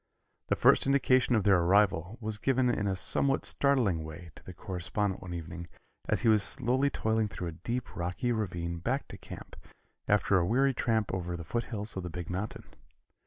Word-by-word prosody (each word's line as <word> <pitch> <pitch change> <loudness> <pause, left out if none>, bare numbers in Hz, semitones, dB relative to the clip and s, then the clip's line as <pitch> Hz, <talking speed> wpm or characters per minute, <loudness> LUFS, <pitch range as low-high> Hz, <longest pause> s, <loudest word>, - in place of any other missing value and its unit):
The - - +1
first - - +4
indication 130 -3 +3
of 110 - +2
their 100 -2 +4
arrival 95 +2 +2
was 110 -2 -1
given 130 -1 +2
in 105 -3 -1
a 95 - 0
somewhat 135 +8 +1
startling 120 - +2
way 80 +2 -9
to - - -15
the - - -9
correspondent 95 +1 -3
one 90 -1 -6
evening 85 +1 -7 0.4
as - - +1
he - - +1
was 110 -2 +5
slowly 130 +5 +2
toiling 110 -4 0
through 90 -3 -5
a 80 +1 -12
deep, 120 +5 -4
rocky 90 +8 -2
ravine 85 -6 -3
back 130 +10 -2
to - - -9
camp, - - -10 0.5
after 100 -2 +3
a - - +1
weary 135 +5 +2
tramp 110 -4 0
over 90 -2 -3
the 85 - -7
foothills 110 +2 -3
of 95 - -3
the 90 - -6
big 90 0 -6
mountain. 100 +4 -4
105 Hz, 190 wpm, -30 LUFS, 90-120 Hz, 0.5 s, was